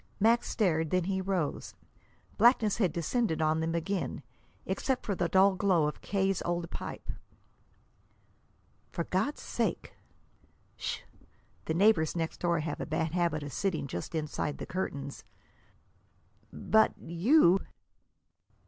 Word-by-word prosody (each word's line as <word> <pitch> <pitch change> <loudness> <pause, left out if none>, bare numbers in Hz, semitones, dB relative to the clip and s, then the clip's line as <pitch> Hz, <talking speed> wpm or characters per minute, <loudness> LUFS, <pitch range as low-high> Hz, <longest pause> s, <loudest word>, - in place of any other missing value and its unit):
Max 230 +3 +3
stared; 165 -7 +1
then 185 +1 +1
he 190 +1 -1
rose. 185 -6 -2 0.6
Blackness 225 -2 +4
had 190 -7 +2
descended 170 +2 0
on 155 0 +2
them 165 +1 -1
again, 185 +3 -2 0.4
except 265 -2 -1
for 205 - 0
the 175 -2 -1
dull 190 +3 +5
glow 185 -4 +2
of 150 - -3
K.'s 195 -2 0
old 175 -1 -2
pipe. - - -6 1.8
"For 170 - -3
God's 190 - -1
sake!" - - -2 0.8
"Sh! - - -4 0.6
The 160 - -1
neighbors 180 -5 +4
next 165 -1 -3
door 170 -2 +1
have 150 -1 -4
a - - -4
bad 160 0 -1
habit 170 -3 0
of 145 -2 -7
sitting 185 -4 -1
just 110 - -5
inside 150 -1 -2
the - - -6
curtains." 140 -7 -4 1.3
"But 220 0 +2
you!" 185 - +4
175 Hz, 130 wpm, -30 LUFS, 160-195 Hz, 1.8 s, dull